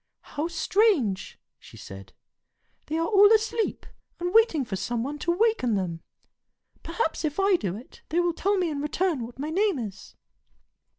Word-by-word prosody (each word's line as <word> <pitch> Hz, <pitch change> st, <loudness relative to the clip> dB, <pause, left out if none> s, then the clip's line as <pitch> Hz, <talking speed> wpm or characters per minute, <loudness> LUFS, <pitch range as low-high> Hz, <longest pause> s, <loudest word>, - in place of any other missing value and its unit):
"How 300 Hz, +3 st, -1 dB
strange!" 335 Hz, -, +1 dB, 0.2 s
she -, -, -15 dB
said. 95 Hz, 0 st, -11 dB, 0.8 s
"They 315 Hz, -, -2 dB
are 330 Hz, -, +1 dB
all 410 Hz, +2 st, +6 dB
asleep, 445 Hz, 0 st, -1 dB, 0.3 s
and 355 Hz, +1 st, -2 dB
waiting 440 Hz, -, +4 dB
for 210 Hz, -, -4 dB
some 230 Hz, +4 st, -2 dB
one 290 Hz, +3 st, -5 dB
to 345 Hz, -, 0 dB
waken 365 Hz, -, +2 dB
them. 175 Hz, -4 st, -3 dB, 0.8 s
Perhaps 330 Hz, -1 st, -2 dB
if 305 Hz, +3 st, -2 dB
I 390 Hz, 0 st, +4 dB
do 195 Hz, -, -2 dB
it, 235 Hz, +5 st, -13 dB
they 335 Hz, -, +1 dB
will 350 Hz, -1 st, +1 dB
tell 400 Hz, +4 st, 0 dB
me 355 Hz, -3 st, 0 dB
in 285 Hz, -1 st, -3 dB
return 305 Hz, -2 st, -1 dB
what 235 Hz, +2 st, -9 dB
my 295 Hz, +3 st, -4 dB
name 395 Hz, 0 st, +1 dB
is." 210 Hz, -5 st, -7 dB
320 Hz, 170 wpm, -26 LUFS, 240-390 Hz, 0.8 s, all